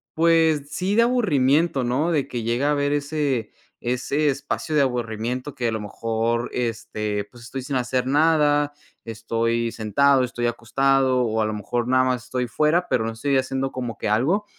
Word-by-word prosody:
Pues 160 -3 +3
sí, 185 +6 -1
de 230 - +5
aburrimiento, 155 - +2
¿no? 140 +8 0
De 145 -4 0
que 120 -3 -4
llega 120 +5 0
a 150 - +3
haber 145 -1 +1
ese 145 -6 -1 0.3
ese 125 +5 -1
espacio 140 +3 -3
de 150 - +5
aburrimiento 125 +1 -2
que 125 -3 -1
a 115 - 0
lo 110 - -2
mejor, 115 +3 -2
este, 110 -3 -3
pues 120 -1 -14
estoy 130 +3 -6
sin 135 +2 -4
hacer 125 0 0
nada, 145 0 +3 0.3
estoy 115 +1 -1
sentado, 130 +5 +2
estoy 120 -1 -2
acostado 130 +2 +1
o 110 -2 0
a - - +2
lo 110 - -2
mejor 120 +3 -2
nada 130 0 +3
más 125 -2 0
estoy 125 -1 -2
fuera, 155 +8 +1
pero 110 -3 +1
no 115 - -2
estoy 135 +4 0
haciendo 135 0 -1
como 120 -4 -5
que - - -2
algo 155 - +1
130 Hz, 180 wpm, -23 LUFS, 115-145 Hz, 0.3 s, de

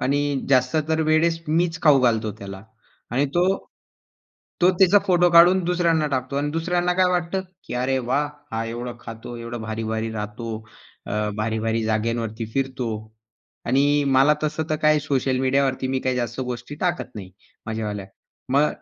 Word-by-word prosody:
आणि 145 0 0
जास्त 130 +2 +3
तर 160 0 +1
वेळेस 165 +1 +2
मीच 165 +1 +1
खाऊ 145 -4 +6
घालतो 110 -3 +2
त्याला 95 -1 -8 0.5
आणि 135 +4 +1
तो 175 +1 +3 1.2
तो 180 - +7
त्याचा 190 +1 +6
फोटो 175 -1 +4
काढून 175 +2 +7
दुसऱ्यांना 170 -3 +2
टाकतो 130 0 -2
अन् 145 +1 0
दुसऱ्यांना 175 +2 0
काय 185 0 +4
वाटतं, 180 +1 0 0.2
की - - -6
अरे 130 +2 0
वाह! 130 +4 0 0.3
हा 115 0 -1
एवढं 120 +1 -5
खातो, 115 +1 -8
एवढं 115 0 -6
भारी-भारी 110 0 -3
राहतो, 105 +2 -5 0.6
अ, 105 0 -1
भारी-भारी 110 +1 -1
जागेवरती 110 +1 -1
फिरतो 130 -2 -1 0.8
आणि 145 +3 +3
मला 135 +3 +5
तसं 155 +1 -1
तर 155 - +2
काही 155 -1 +4
सोशल 135 -3 0
मीडियावरती 130 0 +1
मी 130 0 0
काही 130 -1 -1
जास्त 120 +1 -3
गोष्टी 125 +2 -5
टाकत 175 -7 -1
नाही 95 -3 -8 0.4
माझ्यावाल्या. 105 -3 -4 0.5
मग 145 +2 +4
130 Hz, 155 wpm, -23 LUFS, 115-155 Hz, 1.2 s, तो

